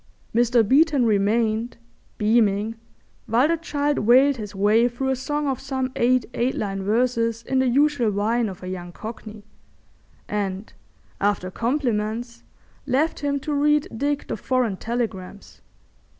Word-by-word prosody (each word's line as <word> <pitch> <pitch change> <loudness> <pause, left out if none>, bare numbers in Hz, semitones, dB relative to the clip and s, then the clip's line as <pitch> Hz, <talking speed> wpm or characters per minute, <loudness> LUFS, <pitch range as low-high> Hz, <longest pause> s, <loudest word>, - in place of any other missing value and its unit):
Mr. 235 -1 +3
Beeton 285 0 +4
remained, 220 +2 +1 0.4
beaming, 215 -1 +2 0.5
while 240 +6 +3
the 335 - +2
child 295 -3 -1
wailed 260 +5 +5
his 210 -2 -7
way 210 +4 +3
through 245 +2 -3
a 265 - +1
song 295 +3 -2
of 265 -3 -1
some 265 -1 -3
eight 250 +1 +2
eight 245 +2 0
line 195 -1 -3
verses 230 +2 0
in 265 +3 0
the 260 - +2
usual 275 -2 +2
whine 215 +3 0
of 185 -1 -10
a - - -6
young 175 -1 -6
Cockney, 215 +1 -9 0.8
and, 200 0 -3 0.5
after 200 -2 0
compliments, 235 -1 -2 0.5
left 285 +5 +1
him 285 -1 -1
to 300 +1 -3
read 295 +1 +2
Dick 285 +4 -1
the - - -3
foreign 250 -6 0
telegrams. 215 -5 -5
235 Hz, 140 wpm, -23 LUFS, 210-265 Hz, 0.8 s, wailed